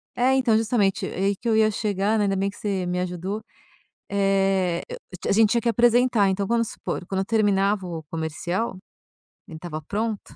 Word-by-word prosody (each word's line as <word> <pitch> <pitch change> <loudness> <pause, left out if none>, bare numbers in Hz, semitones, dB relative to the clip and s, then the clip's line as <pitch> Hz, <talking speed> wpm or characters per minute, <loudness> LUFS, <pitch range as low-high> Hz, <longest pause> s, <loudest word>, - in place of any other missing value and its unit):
É, 255 +2 +3
então 245 -5 +3
justamente, 220 -3 +1
aí 195 +2 -1
que - - -6
eu 225 - +3
ia 220 0 +4
chegar, 205 +1 0
né, 210 - +2
ainda 195 -1 0
bem 195 +1 0
que - - -12
você 195 -3 -2
me 180 0 -1
ajudou, 185 +4 -3 0.7
eh, 195 -3 +1
eu - - -6 0.3
a - - +3
gente 215 0 +5
tinha 235 -1 +2
que 235 - -2
apresentar 235 -3 +3
então 195 +1 -1
vamos 230 0 +1
supor, 180 - -5
quando 190 +1 -2
eu 190 - -1
terminava 200 -2 +2
o 165 -3 -6
comercial, 175 +6 -3 0.7
ele 160 - -9
estava 155 -2 -6
pronto, 210 +5 -2
200 Hz, 190 wpm, -24 LUFS, 185-220 Hz, 0.7 s, gente